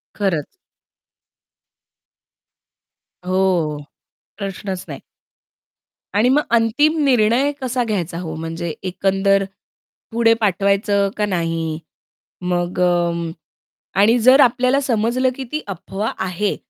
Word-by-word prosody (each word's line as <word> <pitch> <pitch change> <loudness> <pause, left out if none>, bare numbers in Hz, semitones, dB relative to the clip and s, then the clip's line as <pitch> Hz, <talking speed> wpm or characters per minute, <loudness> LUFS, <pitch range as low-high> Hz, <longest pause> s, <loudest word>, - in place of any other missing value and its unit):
खरंच. 185 -8 -1 2.8
हो, 185 -5 +1 0.6
प्रश्नच 195 -2 -5
नाही. - - -8 1.1
आणि 220 +5 +3
मग 295 +3 +4 0.2
अंतिम 290 +8 +2
निर्णय 250 +2 +3
कसा 255 -1 -1
घ्यायचा 180 -7 -2
हो? 160 -3 -5
म्हणजे 165 0 -4
एकंदर 195 +1 +1 0.7
पुढे 230 0 +4
पाठवायचं 200 0 +2
का 210 - +1
नाही, 165 -4 -2 0.6
मग 180 0 -2
अं, 170 -2 +1 0.7
आणि 225 +4 +5
जर 255 +4 +6
आपल्याला 255 +1 +3
समजलं, 245 0 +1
की 265 - -5
ती 305 0 -2
अफवा 195 +3 -4
आहे, 190 +2 -1
200 Hz, 95 wpm, -20 LUFS, 175-235 Hz, 2.8 s, जर